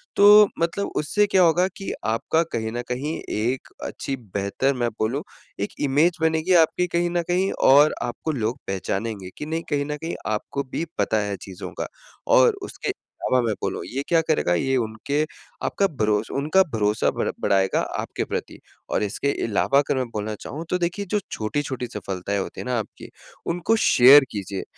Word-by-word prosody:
तो 205 +1 +8
मतलब 170 +4 0
उससे 205 +8 +2
क्या 190 - +3
होगा 175 +2 +4
कि, 195 +1 -7
आपका 115 +9 +1
कहीं 110 -1 -2
न 120 +1 -3
कहीं 140 +6 -2
एक 120 +5 -1 0.2
अच्छी 135 - -4 0.2
बेहतर 100 +8 0
मैं 120 -2 0
बोलूँ 125 +7 -1 0.4
एक 100 - -2
इमेज 150 +5 +2
बनेगी 160 +3 +2
आपकी 175 +2 +3
कहीं 175 0 0
न 175 0 0
कहीं 185 +2 +1 0.2
और 145 +3 +7
आपको 120 +6 -3
लोग 120 -3 -2
पहचानेंगे 95 +1 -3
कि - - -5
नहीं 165 +2 -3
कहीं 145 -2 0
न 150 0 -4
कहीं 165 - -3 0.2
आपको 110 +6 -2
भी 165 - -2
पता 110 - +1
है 100 - -2
चीज़ों 95 -2 -8
का। - - -2 0.5
और - - +6
उसके - - -5 0.4
अलावा 130 -1 +4
मैं 110 - +1
बोलूँ - - -2
ये 135 - -3
क्या 170 - +4
करेगा 155 - +1
ये 135 +10 +1
उनके 115 +5 -1 0.4
आपका 195 - +1
भरोस 105 -1 +1
उनका 155 +7 +3
भरोसा 105 -1 +1
बढ़ - - -2
बढ़ाएगा 95 -1 +2 0.2
आपके - - -3
प्रति - - -5 0.3
और - - 0
इसके 105 +7 -1
अलावा 115 +5 +2
अगर 145 0 0
मैं 130 - 0
बोलना 110 -1 -4
चाहूँ। 155 +3 -6
तो 180 - +1
देखिए 175 +4 -2
जो 210 - +2
छोटी-छोटी 125 +2 -3
सफलताएँ 100 -1 -3
होती 95 - -5
है - - -7
ना? 125 -1 0
आपकी 105 - -8 0.4
उनको 175 +6 +1
शेयर 140 - +7
कीजिए। 100 -2 -4
140 Hz, 180 wpm, -23 LUFS, 110-165 Hz, 0.5 s, तो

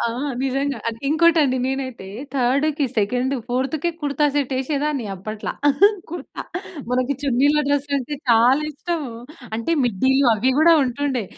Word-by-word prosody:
ఆ! - - 0 0.4
నిజంగా 275 +1 -1
అది 230 0 -5
ఇంకోటండి. 315 -4 +4
నేనైతే 260 -6 -4 0.3
థర్డ్‌కి, 280 +4 +1
సెకండ్, 250 +6 0
ఫోర్‌త్‌కి 270 +7 -1
కుర్తా 295 0 +1
సెట్ 280 -2 0
వేసేదాన్ని. 280 0 -1
అప్పట్ల 215 +3 -6 0.6
కుర్తా 350 - -7 0.5
మనకి 255 +2 +1
చున్నీలు 285 +3 +3
డ్రెస్ 285 0 0
అంటే 275 +2 -3 0.2
చాలా 245 +6 +5
ఇష్టం. 325 +2 -3 0.5
అంటే 230 +8 -1
మిడ్డీలు 260 +5 +2
అవి 240 +5 +1
గూడా 330 +1 +6
ఉంటుండే. 255 -2 -2
270 Hz, 125 wpm, -21 LUFS, 250-295 Hz, 0.6 s, గూడా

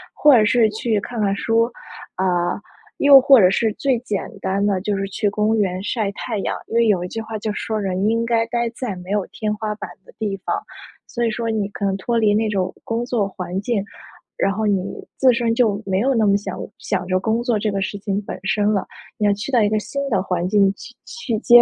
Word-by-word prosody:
或 295 -3 +6
者 220 - +5
是 230 +1 +4
去 215 0 0
看 230 +2 -5
看 200 -1 +2
书， 230 +3 +1 0.4
啊， 180 -1 0 0.4
又 280 -1 +8
或 270 -1 +7
者 185 -3 +6
是 220 +3 +1
最 265 -3 +2
简 210 -5 -3
单 195 +1 0
的 195 -3 +1
就 205 0 -1
是 195 - -1
去 205 +2 -1
公 215 +2 +1
园 185 -3 0
晒 205 0 -1
太 220 +1 -4
阳。 - - -2
因 - - -5
为 235 -1 +4
有 185 -4 +2
一 - - -4
句 225 +5 -5
话 220 -1 -5
就 215 - -3
说 215 +1 -3
人 190 -1 -1
应 230 +1 +1
该 230 -1 +2
待 235 0 -1
在 225 -8 -4
没 180 +2 -9
有 205 -2 +1
天 215 -1 -3
花 210 0 -3
板 - - -7 0.2
的 - - -15
地 205 -3 -1
方。 - - -1 0.5
所 240 - -3
以 230 - +1
说 230 +1 -2
你 210 -3 -1
可 200 0 -4
能 195 - +1
脱 230 +5 -1
离 215 -2 +3
那 220 0 +1
种 185 -2 -1
工 230 +1 -2
作 240 -4 0
环 185 0 -4
境， 225 -1 0 0.6
然 195 - +2
后 215 +2 -2
你 195 -3 +1 0.3
自 260 -2 +4
身 230 -1 0
就 220 -4 +2
没 190 0 0
有 270 +5 +2
那 225 -3 +2
么 200 - +4
想 195 -2 -4 0.2
想 185 -3 -2
着 185 0 +2
工 220 +5 0
作 240 -2 +1
这 210 0 -1
个 195 0 -2
事 200 +1 -3
情 200 0 -2
本 - - -6
身 205 +1 +1
了。 195 - 0 0.3
你 210 - 0
要 205 - +4
去 210 +7 -6
到 240 - +5
一 205 - +2
个 215 0 +1
新 280 +6 -4
的 195 -6 +1
环 180 -2 -1
境 200 -1 +4
去 245 - -12
去 250 - -3
接 240 +1 +8
210 Hz, 260 characters per minute, -21 LUFS, 195-230 Hz, 0.6 s, 又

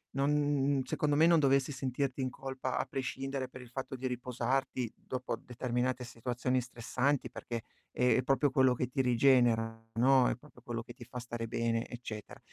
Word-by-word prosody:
non 140 +2 +2
n 145 -1 +2
n - - +1
secondo 145 +2 +1
me 160 +3 +6
non 170 -1 +6
dovessi 140 -1 +3
sentirti 130 +1 -2
in 130 - 0
colpa 130 0 -4
a - - 0
prescindere 135 0 -3
per 130 - -10
il 125 - -12
fatto 130 +2 -5
di 130 +1 -2
riposarti 125 0 -1
dopo 130 -2 -4
determinate 125 +1 -2
situazioni 125 +2 -1
stressanti, 125 +2 -1
perché 120 -1 -5 0.3
è 125 0 +3
proprio 135 +2 +3
quello 130 -1 +4
che 125 +1 -1
ti 135 +2 0
rigenera, 120 -3 +3
no, 130 +2 +5
è - - 0
proprio 130 -2 -18
quello 120 -2 -3
che - - -11
ti 120 - -11
fa - - -13
fa - - -1
stare 120 -1 -5
bene, 115 0 0
eccetera. 110 -3 -7
130 Hz, 185 wpm, -32 LUFS, 120-135 Hz, 0.3 s, me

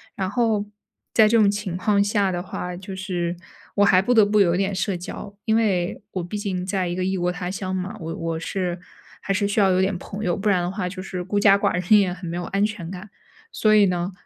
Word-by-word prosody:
然 190 -1 -2
后 220 -2 +1 0.5
在 220 - +6
这 230 - +4
种 205 - +5
情 200 -3 -3
况 200 +2 +2
下 205 -1 +1
的 175 0 -3
话， 180 -1 -5
就 190 +2 -8
是 180 -2 -3 0.4
我 205 0 +4
还 185 -2 +5
不 245 +6 +1
得 220 -3 +6
不 210 0 +3
有 175 -3 +3
点 195 +1 0
社 185 0 -1
交， 200 +3 -8
因 220 - +2
为 190 -6 0
我 185 - -3
毕 175 +5 -5
竟 190 -3 -3
在 185 -2 -1
一 175 - -3
个 185 - -1
异 190 0 0
国 175 0 0
他 180 0 -4
乡 190 0 -4
嘛， 190 +3 -3
我 165 0 -4
我 165 -1 -3
是 180 +1 -3 0.4
还 195 - -1
是 200 +1 +1
需 205 +2 0
要 195 -1 +4
有 185 - +2
点 190 0 0
朋 200 +4 -7
友， 175 - +1
不 205 +2 -1
然 185 -3 +3
的 175 - -1
话 185 -1 -3
就 185 0 -7
是 185 -1 -5
孤 205 +3 -1
家 200 -1 +6
寡 - - +1
人 180 +3 +1
也 190 -3 +1
很 180 -1 -8
没 170 - -4
有 175 - -3
安 200 +1 +1
全 205 -6 -5
感。 190 +3 -8 0.4
所 215 -1 +2
以 210 -1 +6
呢， 180 0 -1
190 Hz, 275 characters per minute, -23 LUFS, 180-205 Hz, 0.5 s, 在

